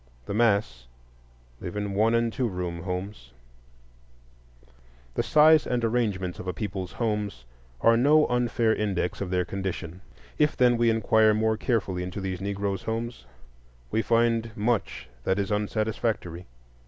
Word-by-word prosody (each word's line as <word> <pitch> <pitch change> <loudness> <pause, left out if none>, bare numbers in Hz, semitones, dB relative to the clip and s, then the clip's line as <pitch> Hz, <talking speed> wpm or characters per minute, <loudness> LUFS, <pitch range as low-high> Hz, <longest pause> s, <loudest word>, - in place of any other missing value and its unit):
The - - -4
mass 100 - +1 0.7
live 90 - -6
in 100 -1 -2
one 110 +3 +3
and 115 -1 +1
two 125 - 0
room 90 -4 -4
homes. 90 - -5 1.8
The - - 0
size 155 0 +5
and 120 -2 0
arrangements 105 -6 -1
of 95 - -7
a 90 - -1
people's 95 -1 -5
homes 105 - -2 0.4
are 115 - +5
no 150 +6 +5
unfair 120 -2 +1
index 100 -5 -2
of 100 - -3
their 90 -1 0
condition. 95 -2 -5 0.4
If, 150 -1 +2
then, 125 -1 +4
we 120 0 +3
inquire 110 -1 +3
more 110 0 +1
carefully 100 -6 -1
into 90 +2 -5
these 95 -2 -4
Negro 100 +1 -2
homes, 115 - -4 0.6
we 110 - +1
find 115 0 +2
much 105 - -1 0.2
that 95 +6 +1
is 100 0 -1
unsatisfactory. 105 -4 -2
105 Hz, 140 wpm, -26 LUFS, 95-115 Hz, 1.8 s, size